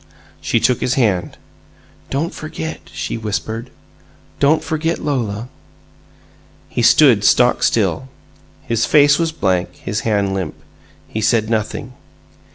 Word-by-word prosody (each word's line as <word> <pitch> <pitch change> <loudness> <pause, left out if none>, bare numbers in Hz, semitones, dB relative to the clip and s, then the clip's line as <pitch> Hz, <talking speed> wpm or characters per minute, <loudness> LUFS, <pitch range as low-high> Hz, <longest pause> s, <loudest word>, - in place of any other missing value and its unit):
She - - +1
took 125 -2 +1
his 125 - 0
hand. 105 -9 0 0.7
"Don't 150 +5 -2
forget!" 160 +1 -7
she - - -4
whispered. 110 +2 -4 0.7
"Don't 145 +3 +3
forget 160 +1 -1
Lola!" 120 -6 -2 1.2
He - - -2
stood - - +5
stock - - +4
still. 130 - +1 0.6
His 115 -1 0
face 145 0 +5
was 165 -1 +1
blank, 95 - -1
his 105 +2 -4
hand 100 -3 0
limp. 95 -6 -3 0.5
He 110 - -4
said 110 0 +1
nothing. 110 +3 -2
115 Hz, 120 wpm, -18 LUFS, 105-145 Hz, 1.2 s, stood